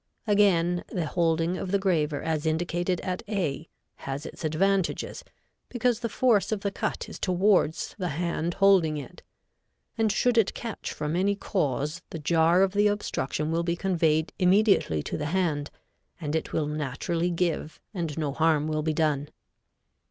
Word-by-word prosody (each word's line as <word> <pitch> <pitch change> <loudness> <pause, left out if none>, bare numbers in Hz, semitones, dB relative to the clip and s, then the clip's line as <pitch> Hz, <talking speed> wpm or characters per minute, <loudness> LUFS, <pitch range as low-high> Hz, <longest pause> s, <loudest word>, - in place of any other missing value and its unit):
Again, 180 -5 +3
the 175 -3 -2
holding 165 +1 +1
of 185 - -4
the 200 - +3
graver 160 -7 0
as 160 -1 -1
indicated 175 +2 0
at 185 -1 -3
A 170 -7 -2 0.3
has 135 +3 -5
its - - -9
advantages, 190 +4 0 0.5
because 245 -2 +1
the 235 -1 -3
force 225 -3 +2
of 215 -2 -1
the 200 - -1
cut - - -3
is - - -9
towards 185 -3 +2
the 180 - -1
hand 170 +1 -2
holding 190 -6 +4
it, 145 +5 -9 0.8
and 220 -1 +3
should 235 +3 +3
it 215 - +1
catch 230 -2 -5
from 150 +1 -3
any 195 +3 +2
cause 150 - -2
the - - -6
jar 165 +3 +3
of 195 0 +1
the 205 +1 +4
obstruction 160 -7 -2
will 165 +1 +1
be 170 0 -1
conveyed 165 -4 +1
immediately 185 - +3
to - - -4
the 150 - -2
hand, 155 -4 0 0.5
and 155 -2 -3
it 160 - -2
will 155 - 0
naturally 150 +4 -2
give 170 -2 -2
and 165 -6 -3
no 150 -3 -1
harm 155 -1 +2
will 155 0 -1
be 155 0 0
done. 150 -2 0
170 Hz, 165 wpm, -27 LUFS, 155-195 Hz, 0.8 s, holding